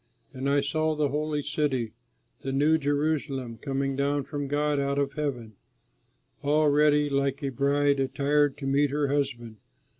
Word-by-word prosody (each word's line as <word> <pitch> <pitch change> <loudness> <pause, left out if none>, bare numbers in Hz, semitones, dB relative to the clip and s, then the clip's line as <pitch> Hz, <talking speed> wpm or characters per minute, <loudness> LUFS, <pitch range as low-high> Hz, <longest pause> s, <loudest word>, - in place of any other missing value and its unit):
And 135 +1 -2
I 140 0 +3
saw 155 +2 0
the 150 -1 +1
Holy 150 0 -2
City, 135 -6 -1 0.5
the 135 - -4
New 150 +4 +3
Jerusalem, 145 -5 -1
coming 135 -1 -2
down 140 +1 0
from 145 +1 -4
God 145 +1 0
out 140 0 -1
of 140 -1 0
heaven, 125 -8 -4 0.8
all 150 +1 +3
ready 150 0 +4
like 140 0 -1
a 140 - 0
bride 140 +2 +1
attired 140 +1 +1
to 145 - -6
meet 140 +1 +2
her 145 0 0
husband. 125 -6 -2
140 Hz, 155 wpm, -27 LUFS, 135-150 Hz, 0.8 s, ready